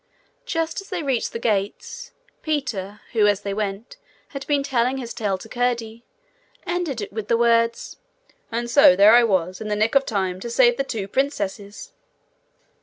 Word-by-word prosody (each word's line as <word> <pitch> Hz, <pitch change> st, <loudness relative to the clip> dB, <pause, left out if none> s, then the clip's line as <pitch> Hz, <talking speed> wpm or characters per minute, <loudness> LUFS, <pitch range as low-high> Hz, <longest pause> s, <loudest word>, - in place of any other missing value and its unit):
Just 330 Hz, -3 st, -2 dB
as 390 Hz, -, -16 dB
they 360 Hz, -4 st, -3 dB
reached 265 Hz, -5 st, -1 dB
the -, -, -4 dB
gates, 465 Hz, -, -3 dB, 0.3 s
Peter, 225 Hz, -10 st, -3 dB
who, 215 Hz, -3 st, +4 dB
as 205 Hz, -1 st, +1 dB
they 200 Hz, -, -3 dB
went, 210 Hz, -, -4 dB, 0.3 s
had 275 Hz, -2 st, -8 dB
been 285 Hz, -2 st, +1 dB
telling 255 Hz, -1 st, 0 dB
his 240 Hz, -3 st, -6 dB
tale 200 Hz, -3 st, -1 dB
to 205 Hz, -, -12 dB
Curdie, 235 Hz, -1 st, -2 dB, 0.6 s
ended 345 Hz, -9 st, -2 dB
it 200 Hz, -, -7 dB
with 215 Hz, -1 st, -5 dB
the 230 Hz, -, +2 dB
words: 230 Hz, 0 st, +1 dB, 0.5 s
'And 235 Hz, +1 st, -2 dB
so 235 Hz, -7 st, +6 dB
there 200 Hz, +3 st, +7 dB
I 240 Hz, 0 st, +7 dB
was, 185 Hz, -4 st, 0 dB
in 215 Hz, -, -5 dB
the 210 Hz, -, -1 dB
nick 215 Hz, +2 st, +1 dB
of 275 Hz, -1 st, +3 dB
time 190 Hz, -4 st, -1 dB
to 235 Hz, -, -6 dB
save 240 Hz, 0 st, +4 dB
the 275 Hz, -, 0 dB
two 215 Hz, -7 st, -4 dB
princesses!' 205 Hz, -5 st, -3 dB
230 Hz, 180 wpm, -22 LUFS, 205-270 Hz, 0.6 s, there